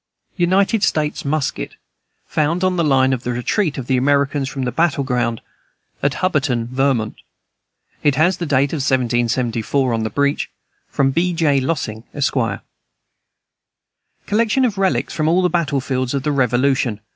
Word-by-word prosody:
United 190 +4 +2
States 155 -2 0
musket, 140 - -2 0.5
found 165 +3 0
on 185 0 +2
the 170 - +1
line 135 -3 +3
of 125 - -2
the 125 - -3
retreat 140 - -1
of 130 - -4
the 130 0 +1
Americans 140 +1 +1
from 135 -2 -4
the 125 - -1
battle 155 0 +1
ground 120 -3 -1 0.6
at 140 0 +1
Hubbardton, 140 -10 0
Vermont. 130 -5 0 0.8
It 145 -2 +2
has 175 +6 +3
the 170 - -4
date 140 +1 +2
of - - -1
1774 125 -1 0
on 115 - 0
the 110 - -1
breech. 140 +5 0 0.4
From 135 -1 +1
B. 175 +5 +1
J. 155 -5 +2
Lossing, 130 -6 -3
Esq. 145 -2 0 1.9
Collection 230 +5 +2
of 210 -5 -2
relics 140 -10 0
from 155 0 0
all 175 +3 +3
the 180 - +3
battle 155 -5 0
fields 130 0 -2
of 135 - -2
the 150 - 0
Revolution. 130 -3 +1
140 Hz, 155 wpm, -19 LUFS, 130-165 Hz, 1.9 s, line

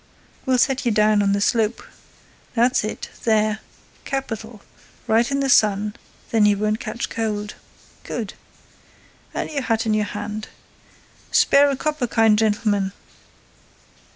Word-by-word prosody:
We'll 260 -1 +3
set 265 +2 +2
you 240 - +1
down 210 0 +3
on 200 0 +2
the 200 - +1
slope. 225 +1 +1 0.7
That's 245 +1 +3
it—there—capital—right 220 +1 -3
in 275 0 0
the 275 - +1
sun, 210 -4 +3 0.4
then 220 -2 +4
you 205 -1 +3
won't 215 +1 0
catch 230 +1 -4
cold—good! 210 -2 -6 1.0
And - - -2
our 285 -2 -2
hat 225 -2 0
in 215 -1 +1
our - - +1
hand.—Spare 215 +6 -1
a 275 - 0
copper, 300 -2 -2
kind 225 -2 +4
gentleman! 205 -3 +1
220 Hz, 115 wpm, -22 LUFS, 210-240 Hz, 1.0 s, then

